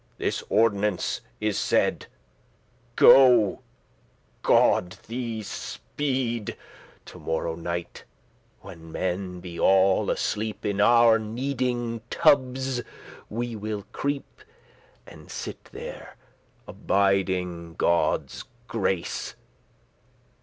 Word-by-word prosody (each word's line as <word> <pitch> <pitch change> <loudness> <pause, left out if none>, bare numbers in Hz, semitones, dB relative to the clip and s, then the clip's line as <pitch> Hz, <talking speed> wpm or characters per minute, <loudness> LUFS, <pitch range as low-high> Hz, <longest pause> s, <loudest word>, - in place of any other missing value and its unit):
This - - -2
ordinance 105 -3 +1 0.2
is 105 -2 0
said: - - +1 0.9
go, 125 -6 +7 0.8
God 90 0 +3
thee 115 -2 -4
speed 125 -1 -3 0.5
To - - -12
morrow 80 0 -2
night, 85 +1 -5 0.6
when 80 0 -12
men 90 +1 -3
be 85 -1 -8
all 95 0 +4
asleep, 105 -1 -2
Into 100 0 +1
our 115 0 +6
kneading 120 0 -2
tubbes 130 -4 +2 0.5
will 115 0 -4
we 105 -1 -4
creep, 140 -1 -4 0.6
And - - -14
sitte - - -7
there, - - -9 0.5
abiding 90 -4 0
Godde's 85 +1 0 0.2
grace. 90 -3 -2
105 Hz, 85 wpm, -26 LUFS, 95-120 Hz, 0.9 s, go